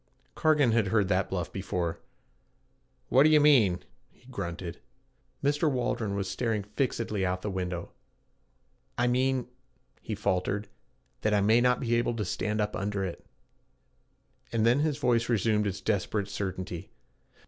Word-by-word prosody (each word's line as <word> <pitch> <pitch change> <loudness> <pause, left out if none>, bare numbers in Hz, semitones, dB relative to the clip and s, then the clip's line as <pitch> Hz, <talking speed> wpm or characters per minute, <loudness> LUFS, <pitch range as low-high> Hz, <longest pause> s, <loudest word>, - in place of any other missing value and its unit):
Cargan 150 -6 +3
had 110 -3 +2
heard 100 -1 +2
that 95 0 +1
bluff 90 -3 -3
before. 90 -3 -2 1.1
'What 130 - +5
d' 150 - +7
you 155 -1 +6
mean?' 120 -12 +4 0.3
he - - -27
grunted. 85 -6 -5 0.6
Mr. 145 +3 +2
Waldron 115 -5 -1
was 100 -1 -2
staring 105 +2 -1
fixedly 105 -1 -2
out 90 0 0
of - - -20
the 105 - -2
window. 90 -2 -4 1.1
'I 120 - +2
mean,' 130 0 +1 0.5
he 110 - -4
faltered, 100 0 -1 0.5
'that 105 0 +2
I 100 - +3
may 110 +4 +4
not 125 0 +3
be 120 -3 0
able 120 0 +1
to 105 -2 -2
stand 105 +3 -2
up 105 0 -1
under 100 -1 -2
it.' 90 - -6 1.3
And 115 -1 +1
then 120 +4 +4
his 150 -1 +1
voice 120 -5 +1
resumed 105 -2 +2
its 95 -1 -4
desperate 100 0 -1
certainty. 95 -3 -4
105 Hz, 150 wpm, -29 LUFS, 95-120 Hz, 1.3 s, d